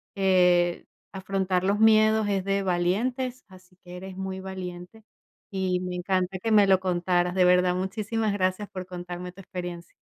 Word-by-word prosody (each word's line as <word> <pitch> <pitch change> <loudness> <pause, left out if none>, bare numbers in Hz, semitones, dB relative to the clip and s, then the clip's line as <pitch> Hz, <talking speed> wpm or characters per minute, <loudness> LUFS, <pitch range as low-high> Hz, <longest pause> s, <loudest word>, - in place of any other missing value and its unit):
eh, 180 -2 +3 0.3
afrontar 190 -1 -1
los 200 +2 +1
miedos 220 -1 +5
es 195 -2 0
de 195 0 0
valientes, 235 +9 -1
así 185 -1 -18
que 180 0 -10
eres 190 +1 -9
muy 190 0 -5
valiente, 185 +2 -8 0.5
y 185 -2 -1
me 180 0 -4
encanta 185 +1 -1
que 225 +3 -2
me 205 -2 +6
lo 190 -1 +4
contaras. 180 -1 0
De 185 -1 +3
verdad, 180 0 +4
muchísimas 210 +3 -2
gracias 185 +1 -1
por 185 -1 -7
contarme 180 0 -7
tu 190 - -17
experiencia. 175 -2 -7
185 Hz, 160 wpm, -26 LUFS, 180-195 Hz, 0.5 s, me